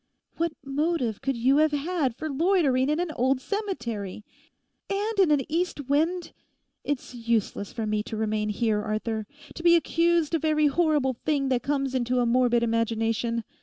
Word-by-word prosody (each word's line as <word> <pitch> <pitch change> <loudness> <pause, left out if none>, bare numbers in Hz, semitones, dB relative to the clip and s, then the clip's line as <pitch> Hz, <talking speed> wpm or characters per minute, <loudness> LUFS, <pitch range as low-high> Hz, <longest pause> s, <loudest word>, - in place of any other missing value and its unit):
What 335 -1 0
motive 275 -5 -1
could 270 -2 -1
you 260 +4 +3
have 310 0 +3
had 290 -4 -1
for 315 - -5
loitering 290 -4 +2
in 305 +2 +1
an 350 -2 -1
old 260 -1 +1
cemetery? 235 - -4 0.6
And 410 +2 -1
in 375 -4 +5
an 295 -2 +3
east 325 -4 -2
wind! 325 +5 0 0.5
It's 285 -3 -3
useless 230 -4 -1
for 225 -2 -3
me 210 0 0
to 220 - -5
remain 215 -1 -1
here, 210 0 0
Arthur, 215 0 -3 0.3
to - - -8
be 340 0 +6
accused 335 -1 +2
of 325 - 0
every 305 -1 +3
horrible 295 -3 +2
thing 275 +2 -1
that 250 -2 +1
comes 275 -2 -1
into 250 0 0
a 245 - +2
morbid 240 0 +3
imagination. 230 0 0
270 Hz, 165 wpm, -26 LUFS, 230-315 Hz, 0.6 s, be